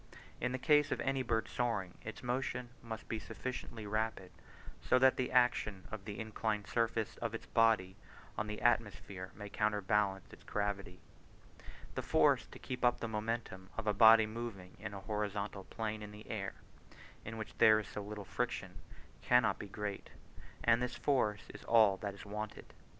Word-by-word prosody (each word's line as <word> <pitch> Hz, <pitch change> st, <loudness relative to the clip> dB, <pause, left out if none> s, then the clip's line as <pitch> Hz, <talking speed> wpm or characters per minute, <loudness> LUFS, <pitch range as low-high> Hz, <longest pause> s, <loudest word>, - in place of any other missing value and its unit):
In 125 Hz, -, 0 dB
the 130 Hz, -, -1 dB
case 150 Hz, +1 st, +4 dB
of -, -, 0 dB
any 135 Hz, -1 st, +1 dB
bird 115 Hz, -3 st, 0 dB
soaring, 110 Hz, -7 st, -1 dB
its 110 Hz, -, -7 dB
motion 125 Hz, 0 st, -2 dB
must 115 Hz, -1 st, -7 dB
be 110 Hz, -, -2 dB
sufficiently 120 Hz, -1 st, -6 dB
rapid 110 Hz, -3 st, -2 dB, 0.5 s
so 130 Hz, -, +4 dB
that 130 Hz, 0 st, +6 dB
the 130 Hz, -, -1 dB
action 115 Hz, -6 st, +2 dB
of 105 Hz, -3 st, -6 dB
the 105 Hz, -1 st, -5 dB
inclined 110 Hz, -1 st, -2 dB
surface 115 Hz, -2 st, 0 dB
of 115 Hz, -1 st, -3 dB
its -, -, -6 dB
body 110 Hz, -5 st, +3 dB, 0.4 s
on 110 Hz, -, -2 dB
the 105 Hz, 0 st, -5 dB
atmosphere 100 Hz, -5 st, 0 dB
may 105 Hz, 0 st, -7 dB
counterbalance 105 Hz, -2 st, 0 dB
its -, -, -14 dB
gravity. 100 Hz, -3 st, -3 dB, 0.9 s
The -, -, -2 dB
force -, -, +3 dB
to -, -, -11 dB
keep 125 Hz, -1 st, -6 dB
up 120 Hz, 0 st, +4 dB
the 115 Hz, -, -2 dB
momentum 110 Hz, -3 st, -3 dB
of 115 Hz, -, -3 dB
a 105 Hz, -, +2 dB
body 110 Hz, +1 st, +8 dB
moving 110 Hz, -5 st, -6 dB
in 100 Hz, -, -6 dB
a 100 Hz, -, -6 dB
horizontal 105 Hz, -1 st, -3 dB
plane 110 Hz, -1 st, -3 dB
in 105 Hz, -, -7 dB
the 105 Hz, +1 st, -11 dB
air 100 Hz, -4 st, -3 dB, 0.7 s
(in 110 Hz, +1 st, -6 dB
which 110 Hz, -, -6 dB
there 110 Hz, -2 st, +7 dB
is 105 Hz, -, -5 dB
so 105 Hz, -, -5 dB
little 105 Hz, 0 st, -6 dB
friction) -, -, -3 dB, 0.4 s
cannot 125 Hz, -2 st, +4 dB
be 105 Hz, -, -6 dB
great, 100 Hz, 0 st, -5 dB, 0.5 s
and 115 Hz, +1 st, +5 dB
this 125 Hz, 0 st, -2 dB
force 110 Hz, -7 st, +1 dB
is -, -, -10 dB
all 110 Hz, -4 st, +6 dB
that 100 Hz, +1 st, -4 dB
is 100 Hz, -, -11 dB
wanted. 105 Hz, +1 st, -6 dB
110 Hz, 175 wpm, -35 LUFS, 100-115 Hz, 0.9 s, body